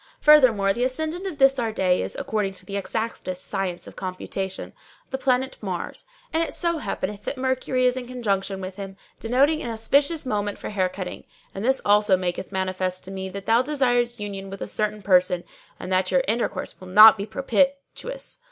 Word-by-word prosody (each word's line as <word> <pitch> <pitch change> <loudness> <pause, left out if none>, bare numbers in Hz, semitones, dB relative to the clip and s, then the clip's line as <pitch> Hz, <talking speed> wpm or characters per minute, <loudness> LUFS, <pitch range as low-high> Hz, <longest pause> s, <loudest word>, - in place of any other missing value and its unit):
Furthermore 240 -10 +5
the 240 - -1
ascendant 315 +8 -2
of 340 -6 -5
this 270 -1 +4
our 230 -2 0
day 185 -4 +1
is, - - -4
according 210 -3 -2
to 185 0 -14
the 200 - -6
exactest 190 -2 -4
science 190 -3 -3
of - - -11
computation, 190 +1 -5 0.4
the 265 - -1
planet 260 0 0
Mars; 185 - -5 0.3
and 325 - +2
it 330 - -2
so 340 -2 0
happeneth 210 -7 -4
that 285 - -3
Mercury 255 0 0
is 250 0 +3
in 255 -1 -5
conjunction 200 -6 -2
with 185 +1 -7
him, 195 -1 -7 0.2
denoting 275 +7 +2
an 240 - -4
auspicious 280 +8 +1
moment 205 -4 -2
for - - -6
hair 190 -3 +1
cutting; 185 -1 -7 0.3
and 195 - -5
this 265 +3 +2
also 205 -1 +4
maketh 180 +1 -3
manifest 185 -1 -2
to 190 - -9
me 190 0 -5
that 195 +1 -7
thou 230 +2 +4
desires 245 -4 +1
union 195 -2 -5
with 195 0 -6
a - - -5
certain 215 -1 -2
person 180 -2 +3 0.4
and 185 - -4
that 185 0 +2
your 270 - +3
intercourse 230 -2 -2
will 185 - -10
not 215 +4 +9
be 200 0 -5
propitious. 275 - -2
210 Hz, 190 wpm, -24 LUFS, 190-260 Hz, 0.4 s, not